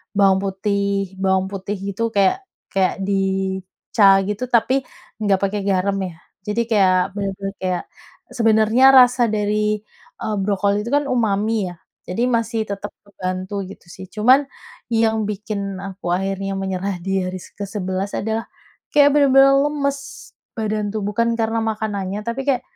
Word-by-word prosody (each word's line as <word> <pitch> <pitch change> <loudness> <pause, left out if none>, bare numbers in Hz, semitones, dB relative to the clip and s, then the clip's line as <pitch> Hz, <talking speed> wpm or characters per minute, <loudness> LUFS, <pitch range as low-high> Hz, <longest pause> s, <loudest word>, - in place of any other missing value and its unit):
bawang 195 -1 +4
putih, 200 0 -1
bawang 190 0 +1
putih 195 +1 -4
gitu 200 +4 -3
kayak 200 - +2 0.3
kayak 195 0 0
di 190 -1 0 0.3
cah 195 -3 +6
gitu, 210 +5 -3
tapi 245 +3 +3 0.4
enggak 200 -3 +2
pakai 200 +1 0
garam 195 +1 +1
ya. 185 -3 -4 0.3
Jadi 215 +3 0
kayak 185 -3 +3
benar-benar, 195 -1 -3
kayak, 185 -2 -1 0.5
sebenarnya 225 +2 +3
rasa 250 -1 +6
dari, 210 0 0 0.5
eee, 215 -1 -1
brokoli 200 +2 0
itu - - -4
kan 290 - +2
umami 215 -3 +1
ya. 175 - -8 0.3
Jadi 235 +7 -1
masih 230 -2 -1
tetap 200 0 -5
kebantu 185 0 -4
gitu 190 -1 -12
sih. 190 +1 -10
Cuman 250 +9 +3 0.5
yang 220 -1 +2
bikin 200 -2 -4
aku 190 -3 -4
akhirnya 195 +1 -2
menyerah 190 -1 -3
di 190 0 -1
hari 185 0 -5
se - - -13
ke-11 195 -1 -3
adalah 220 +2 -2 0.5
kayak 290 -1 +6
benar-benar 275 -1 +6
lemes 280 -1 -2 0.2
badan 215 -2 -2
tuh, 215 - -2
bukan 230 +3 0
karena 225 0 -1
makanannya, 210 -2 -3
tapi 235 +5 -4
kayak, 260 -3 +1
205 Hz, 145 wpm, -21 LUFS, 195-225 Hz, 0.5 s, cah